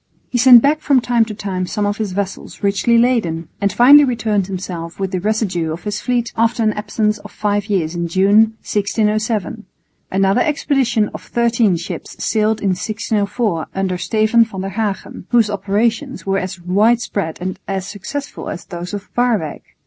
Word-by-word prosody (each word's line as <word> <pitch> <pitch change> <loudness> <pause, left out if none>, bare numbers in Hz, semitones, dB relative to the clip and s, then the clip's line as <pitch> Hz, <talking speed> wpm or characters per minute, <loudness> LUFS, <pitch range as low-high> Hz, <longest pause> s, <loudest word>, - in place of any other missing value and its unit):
He 245 - 0
sent 245 -1 +8
back 295 +2 +3
from 280 -4 +3
time 240 -1 +2
to 215 -1 -7
time 190 -3 -3
some 210 +1 -2
of 205 +1 -1
his 215 -3 -3
vessels 195 +1 -5
richly 200 +4 +2
laden, 220 -10 +1
and 200 0 +2
finally 280 +7 +7
returned 220 -7 0
himself 180 -3 -6
with 195 -1 -2
the 185 - -1
residue 190 -5 -1
of 165 +2 -6
his 210 0 -3
fleet 240 +1 -1
after 230 +1 +1
an 215 -1 +2
absence 210 +1 -1
of - - -11
five 205 -1 -1
years 180 -6 0
in 170 -1 -2
June, 205 +5 +3
1607. 215 +1 -1 0.4
Another 195 +4 +2
expedition 265 -7 +1
of - - -7
thirteen 230 -5 +1
ships 170 +3 -7
sailed 220 0 +1
in 200 - +1
1604 205 -1 -1
under 190 -2 -1
Steven 220 +3 +3
van 200 -4 -6
der 195 - -3
Hagen, 200 -2 -4
whose 230 -3 +3
operations 225 +7 -1
were 195 0 +1
as 185 0 -5
widespread 200 -1 +1
and 185 +1 -4
as 195 -1 -3
successful 275 +9 -6
as 175 - -6
those 175 +2 -6
of 205 0 -7
Waerwyck. 225 -11 0
210 Hz, 170 wpm, -18 LUFS, 190-230 Hz, 0.4 s, sent